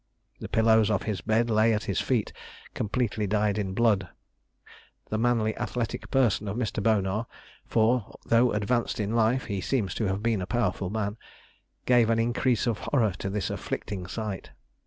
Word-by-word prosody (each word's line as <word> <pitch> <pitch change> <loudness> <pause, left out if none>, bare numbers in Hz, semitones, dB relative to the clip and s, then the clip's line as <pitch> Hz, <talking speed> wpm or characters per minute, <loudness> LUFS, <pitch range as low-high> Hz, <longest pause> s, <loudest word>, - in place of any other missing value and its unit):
The - - -7
pillows 110 -1 +4
of 105 -3 +1
his 105 -5 -3
bed 115 +2 +1
lay 110 +1 +4
at 105 - -2
his - - -1
feet, 120 -5 0 0.4
completely 110 -1 -1
dyed 105 0 +1
in 95 -2 -3
blood. 105 -6 +2 1.0
The 110 - 0
manly 115 -2 +1
athletic 115 -2 -3
person 120 -6 +2
of 100 +3 -3
Mr. 110 -3 -2
Bonar 105 +1 +1 0.4
for, 115 0 +1
though 120 +1 +4
advanced 115 +3 0
in 105 +1 -1
life, 115 +3 +2
he 100 -4 -3
seems 110 -3 -1
to - - +1
have 95 +2 -1
been 115 -4 +1
a 90 - -4
powerful 120 -5 -1
man 105 0 -2 0.7
gave 120 -3 +4
an 115 - +3
increase 120 +1 +1
of 115 -4 0
horror 115 -9 +1
to 95 - -3
this 100 -1 -2
afflicting 95 -3 -4
sight. 105 -1 -5
110 Hz, 170 wpm, -27 LUFS, 100-115 Hz, 1.0 s, pillows